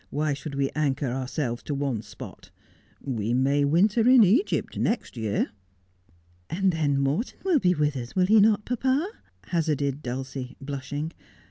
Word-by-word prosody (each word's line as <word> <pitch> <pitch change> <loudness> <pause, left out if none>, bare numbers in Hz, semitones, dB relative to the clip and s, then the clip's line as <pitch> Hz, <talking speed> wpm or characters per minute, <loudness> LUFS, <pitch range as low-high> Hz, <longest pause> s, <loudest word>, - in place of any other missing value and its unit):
Why 150 +1 0
should 140 +1 -6
we 140 -1 0
anchor 145 -3 -1
ourselves 130 -1 -3
to 145 - -4
one 135 -6 -1
spot 105 - -11 0.5
1 135 -3 -4
We 110 +2 -1
may 140 +3 +2
winter 205 - +3
in 255 -3 +8
Egypt 230 - +2
next 220 - -1
year.' 110 -3 -1 0.5
' 85 0 -35
And 190 +2 +1
then 150 -4 +1
Morton 145 - -1
will 365 -6 +3
be 180 -5 +2
with 150 -1 +1
us, 120 -2 -6
will 185 -1 +4
he 215 +3 +5
not, 210 0 +4
papa? 265 - 0 0.2
' - - -31
hazarded 150 -4 0
Dulcie, 130 0 -5
blushing. 145 +3 -5
145 Hz, 165 wpm, -26 LUFS, 130-190 Hz, 0.5 s, in